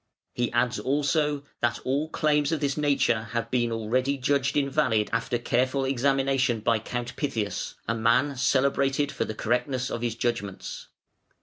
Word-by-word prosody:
"He 120 -1 -1
adds 120 +1 +1
also 145 +1 0 0.2
that 120 0 +1
all 140 +4 0
claims 150 -1 +1
of 160 - 0
this 140 -1 0
nature 140 -7 +1
have 115 -1 -2
been 120 -2 +1
already 125 +5 0
judged 140 +1 +1
invalid 140 -7 +1
after 115 +1 0
careful 130 +3 0
examination 135 -2 +1
by 115 0 +2
Count 120 +2 -5
Pythias, 115 -8 -3
a 115 - +1
man 120 +5 +2
celebrated 140 +2 +1
for - - -2
the 110 - -5
correctness 125 +1 -1
of 115 - -3
his 120 -2 -1
judgments. 115 -5 -3
130 Hz, 150 wpm, -26 LUFS, 120-140 Hz, 0.2 s, by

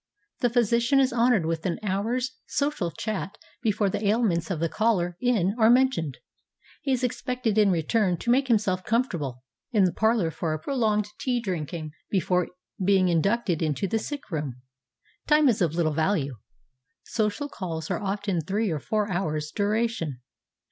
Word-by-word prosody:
The 245 - +2
physician 235 +3 +3
is 265 -2 +3
honored 235 -6 +3
with 165 0 -2
an 170 - -1
hour's 225 +6 -1 0.2
social 280 - -1
chat 200 +1 -4 0.2
before 215 -3 +1
the 200 +2 -2
ailments 205 -6 +1
of 180 -5 -2
the 165 - +1
caller 180 -3 +1
in 215 -6 +2
are 220 0 +6
mentioned. 240 - +3 0.6
He 275 - -1
is 255 -1 +1
expected 250 -2 -1
in 210 -2 +5
return 180 +2 +1
to 235 - 0
make 265 +2 +3
himself 205 -6 +1
comfortable 170 - -1 0.3
in 210 -5 +4
the 180 - +2
parlor 220 -6 +2
for 160 0 -2
a - - -5
pro 280 - -4
longed 215 -4 +2
tea 250 -2 0
drinking 165 -6 -4 0.2
before 180 -2 +1 0.4
being 190 -1 +4
inducted 180 +1 +1
into 155 +5 0
the 225 +4 0
sick 285 -2 -6
room. 140 -6 -4 0.6
Time 300 -1 +5
is 230 -4 +2
of 165 -4 +2
Httle 165 -2 +1
value. 155 - 0 0.7
Social 220 +5 -1
calls 165 - -5
are - - -1
often 200 -1 -1
of 160 -1 -3
three 205 0 0
or 155 - -1
four 210 +7 -1
hours' 155 -4 -2
duration. 205 - -1
200 Hz, 170 wpm, -26 LUFS, 170-235 Hz, 0.7 s, are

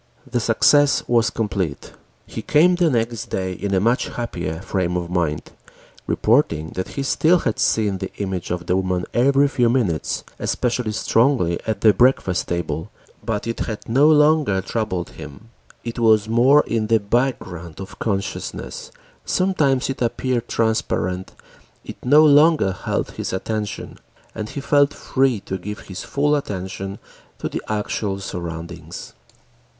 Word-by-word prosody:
The 125 -2 -1
success 140 +6 +4
was 120 -1 +3
complete. 100 -10 -3 0.3
He - - -6
came 165 +5 +4
the 175 -2 +2
next 115 -4 -1
day 95 -1 -2
in 100 +3 -4
a - - +3
much 115 +5 +1
happier 90 -9 -4
frame 90 -1 -1
of 85 0 -4
mind, 85 -4 -1 0.6
reporting 95 - +2
that 95 - -4
he 140 - 0
still 160 +5 +3
had 115 -10 -2
seen 105 -4 +1
the 95 0 -5
image 95 -3 -3
of 90 0 -3
the 90 - +1
woman 90 -1 -1
every 140 +3 +4
few 120 -4 +2
minutes, 110 - 0 0.2
especially 120 -2 -1
strongly 115 -6 +2
at 110 - -2
the 110 -2 +6
breakfast 95 -5 +2
table, 80 -2 -3 0.3
but 105 -2 -2
it 115 0 -3
had 110 -2 -4
no 135 +6 +4
longer 150 -8 +4
troubled 95 -3 -3
him. 100 +11 -11 0.3
It 115 0 -5
was 110 -2 +4
more 125 +6 +5
in 110 -1 -1
the 115 0 +4
background 100 -7 -2
of 95 0 -9
consciousness, 100 -3 -4 0.3
sometimes 150 -9 +1
it 135 -1 -4
appeared 120 0 -1
transparent, 95 -5 -1 0.5
it - - -10
no 150 +5 +6
longer 150 -6 +5
held 90 - -3
his - - -5
attention, 105 +2 -4 0.3
and 110 -1 -5
he 140 - -5
felt 145 +1 +3
free 130 -5 0
to 95 0 -5
give 105 +3 -6
his 95 -1 -8
full 145 +1 +1
attention 95 -5 -4 0.4
to - - -3
the - - -4
actual 105 -1 -2
surroundings. 85 -2 -7
110 Hz, 150 wpm, -21 LUFS, 95-130 Hz, 0.6 s, the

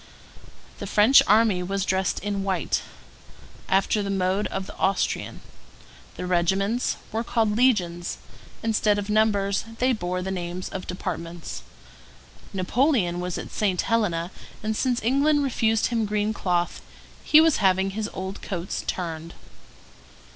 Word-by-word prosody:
The - - -5
French 220 +6 +6
army 210 -3 +4
was 195 +2 -2
dressed 190 0 0
in 200 -1 -2
white, 190 -4 0 0.9
after 195 +2 +2
the 200 - -3
mode 195 +1 0
of 190 - -4
the - - -10
Austrian; 195 +1 -1 0.8
the - - -4
regiments 190 +6 +1
were 225 +1 -1
called 220 -3 +1
legions; 185 -8 +1 0.5
instead 215 -2 +2
of 205 0 -3
numbers 205 -2 +2
they 255 +2 +2
bore 180 -4 -3
the 190 - -3
names 180 0 -4
of 185 - -6
departments; 170 -2 -5 0.9
Napoleon 195 - +1
was 180 0 -3
at - - -7
St. 195 -4 0
Helena; 190 -7 0 0.3
and 215 0 -1
since 245 -1 0
England 285 +5 +3
refused 225 -4 +1
him 230 -3 0
green 210 +1 0
cloth, 175 -4 -1 0.4
he 305 - +7
was 320 -2 +5
having 190 -1 +2
his 215 +2 -3
old 190 +1 -6
coats 180 -1 -4
turned. 165 -2 -4
195 Hz, 135 wpm, -25 LUFS, 180-220 Hz, 0.9 s, he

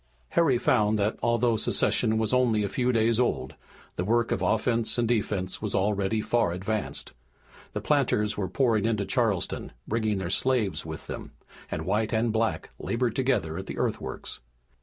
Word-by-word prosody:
Harry 150 -7 +3
found 110 -3 +2
that, 105 +1 +1
although 120 0 +2
secession 110 0 +1
was 110 +1 0
only 120 -4 +3
a 100 - -1
few 125 +3 +1
days 115 0 +2
old, 65 - 0 0.4
the 90 - 0
work 115 +4 +1
of - - 0
offense 115 +1 +1
and 120 -1 +2
defense 105 -5 -1
was 105 -2 -2
already 100 +2 +1
far 115 -5 +1
advanced. 100 +4 -3 0.6
The - - -3
planters 105 0 +1
were 95 -3 -2
pouring 115 -6 +2
into 110 -3 0
Charleston, 110 -7 0
bringing 110 -2 0
their 90 -2 -3
slaves 125 -6 +1
with - - -7
them, - - -7 0.4
and - - -4
white 105 +4 0
and 110 0 +1
black 110 0 -1
labored 120 -1 -1
together 110 -12 0
at - - -7
the - - -6
earthworks. - - -3
110 Hz, 165 wpm, -27 LUFS, 105-120 Hz, 0.6 s, Harry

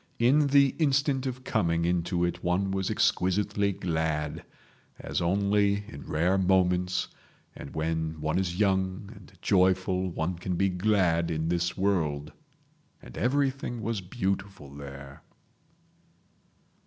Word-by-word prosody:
In 140 +5 +4
the 140 0 +5
instant 140 -3 +1
of 130 0 -5
coming 85 -8 0
into 85 0 0
it 85 - -4
one 95 +2 0
was 95 -1 -1
exquisitely 100 +2 +1
glad—as 80 -5 -4
only 100 +3 +2
in 70 - -10
rare 90 +5 +2
moments 90 -1 +2 0.5
and - - -10
when 80 0 -2
one 80 +4 0
is 90 -1 -2
young 95 -1 0
and - - -15
joyful 95 0 +2
one 85 +1 -3
can 90 0 -2
be 95 +2 +2
glad 90 -3 +1
in 80 0 -1
this 85 0 -1
world. 75 -7 0 0.7
And 60 - -13
everything 130 -1 -1
was 110 -2 -2
beautiful 95 - -4
there 70 -1 -10
95 Hz, 120 wpm, -28 LUFS, 85-100 Hz, 0.7 s, the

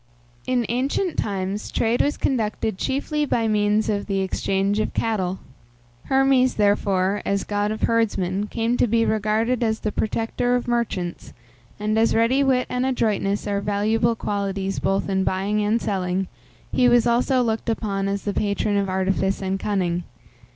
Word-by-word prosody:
In 250 -2 +1
ancient 275 - -1
times, 195 0 -3
trade 230 +2 +1
was 290 - 0
conducted 220 -5 -1
chiefly 300 +3 -1
by 235 -5 0
means 210 0 +2
of 205 -1 -1
the 195 -2 0
exchange 195 +2 0
of 215 - -2
cattle. 190 -5 -1 0.7
Hermes, 265 -1 +3
therefore, 200 -1 +1
as 200 0 0
god 205 0 -1
of 215 - -4
herdsmen, 205 -4 +1
came 230 +2 -1
to - - +3
be 230 +1 +2
regarded 220 +3 +1
as 220 -1 0
the 215 - -1
protector 225 +3 -1
of 245 - -2
merchants, 225 -8 -2 0.5
and, 215 +1 0
as 225 - +3
ready 235 +5 +3
wit 255 -2 +2
and 250 0 -1
adroitness 215 -6 0
are 200 -1 -1
valuable 215 +3 +1
qualities 200 -2 -2
both 195 0 0
in 190 -1 +1
buying 200 +3 0
and 215 +3 +2
selling, 190 -3 -1 0.4
he 250 -1 +4
was 240 -1 +4
also 250 +2 +2
looked 225 0 -1
upon 200 -3 -1
as 200 0 -2
the 205 - -2
patron 205 0 0
of 200 -1 0
artifice 190 +1 0
and 195 0 -2
cunning. 180 -4 -1
210 Hz, 160 wpm, -23 LUFS, 195-235 Hz, 0.7 s, he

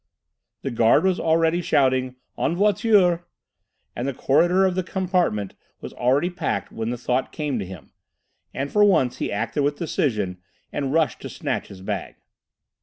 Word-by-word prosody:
The 135 - -2
guard 115 +4 +4
was 190 -1 +2
already 165 +1 +2
shouting 130 -4 +1 0.2
"en 165 - 0
voiture" 195 -3 +3 0.7
and 120 - -3
the 140 - -3
corridor 175 +9 +3
of 185 -1 +1
his 185 -1 -1
compartment 180 - 0 0.3
was - - -8
already 135 +8 +1
packed 175 - -3
when 110 0 -3
the 120 - -3
thought 125 +2 -1
came 145 -6 -2
to 100 - -3
him. 90 -7 -11 0.6
And, 140 +1 -4
for 210 - +4
once, 130 -11 +3
he - - -2
acted 115 +8 -1
with 145 +1 +1
decision 105 - -1 0.3
and 140 -2 -2
rushed 160 0 +1
to - - -6
snatch - - -3
his 95 -2 -12
bag. 95 - -4
145 Hz, 165 wpm, -23 LUFS, 120-175 Hz, 0.7 s, guard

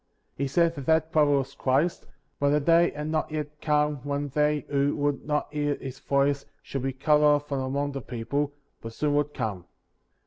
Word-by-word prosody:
He 140 - -1
said 165 +4 +2
that 140 -4 -8
that 160 0 +3
prophet 150 -2 +4
was 135 0 -3
Christ; 140 +7 0 0.3
but 145 - +2
the 150 +1 +3
day 170 +3 +4
had 150 +1 -5
not 155 0 -1
yet 150 -1 -5
come 150 -1 +2
when 145 +2 -3
they 150 +1 +1
who 140 0 +1
would 145 -1 -1
not 150 0 -1
hear 145 -1 0
his 135 -1 -8
voieo 140 0 +1 0.2
should 135 - -4
be 135 +1 -1
cut 150 +3 +2
off 145 -1 +4
from 140 -2 -2
among 140 +2 -1
the 135 -1 -5
people, 135 +5 -2 0.3
but 115 0 -7
soon 145 +4 0
would 145 0 +1
come. 100 -5 -3
145 Hz, 200 wpm, -27 LUFS, 140-150 Hz, 0.3 s, prophet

